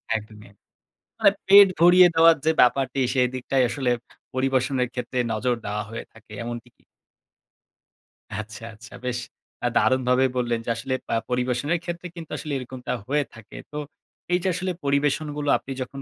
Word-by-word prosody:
একদমই। 105 -1 -7
অ্যা 100 - -20 0.6
মানে 200 - +6 0.2
পেট 200 +1 +9
ভরিয়ে 180 +2 +8
দেওয়ার 165 0 +7
যে 160 - +5
ব্যাপারটি, 135 +1 +2
সেদিকটাই 130 0 +1
আসলে 125 +1 0 0.4
পরিবেশনের 130 0 +1
ক্ষেত্রে 125 0 -3
নজর 120 +3 0
দেওয়া 105 +1 -2
হয়ে 115 +1 -6
থাকে, 110 -1 -19
এমনটি 120 -1 -6
কি? - - -31 1.5
আচ্ছা, 110 +2 -7
আচ্ছা 105 -1 -14
বেশ 125 -1 -1 0.5
আ - - +4
দারুণভাবে 130 0 +3
বললেন, 120 -2 0
যে - - -4
আসলে 130 +3 -4 0.2
আ - - +3
পরিবেশনের 125 +6 0
ক্ষেত্রে 175 +1 -5
কিন্তু 165 -2 -9
আসলে 155 - -6
এরকমটা 125 -1 -5
হয়ে 145 +2 +1
থাকে। 110 -2 -13
তো, 150 - -6 0.6
এই 180 - +4
যে - - 0
আসলে 185 +1 -2
পরিবেশনগুলো 145 +1 0
আপনি 135 - -10
যখন 135 +2 -6
130 Hz, 155 wpm, -24 LUFS, 120-150 Hz, 1.5 s, পেট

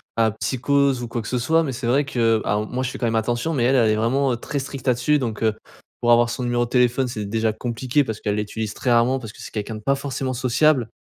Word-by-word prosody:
à 110 -1 +3
psychose 135 +3 +1
ou - - -4
quoi 115 +1 -3
que 110 - -8
ce 125 - -1
soit, 160 +7 +2
mais 135 -4 -3
c'est 120 -1 -4
vrai 140 +4 +2
que 115 -5 +1
alors 105 +1 0
moi 125 +3 -3
je 125 - -1
fais - - -7
quand 120 - -2
même 115 -1 0
attention, 120 +8 0
mais 125 - 0
elle, 130 - +3
elle 115 -4 +4
est 110 - +2
vraiment, 130 +5 +1
heu, 120 - -2
très 140 +4 -4
stricte 135 0 -7
là-dessus. 125 +5 +2
Donc, 115 -4 -3
heu, 110 -1 +3 0.5
pour 120 - +3
avoir 120 0 +5
son 125 - -4
numéro 120 0 +1
de - - -11
téléphone, 125 +1 +2
c'est 110 -4 -4
déjà 110 +2 0
compliqué 125 +5 -1
parce 110 -4 -5
qu'elle 105 -1 -1
l'utilise 105 +1 -3
très 125 - -1
rarement 120 +3 +3
parce 110 -4 -9
que - - -13
c'est - - -9
quelqu'un 110 0 -4
de - - -7
pas 140 +5 +1
forcément 135 -1 -3
sociable. 130 +1 +2
120 Hz, 280 wpm, -22 LUFS, 115-130 Hz, 0.5 s, avoir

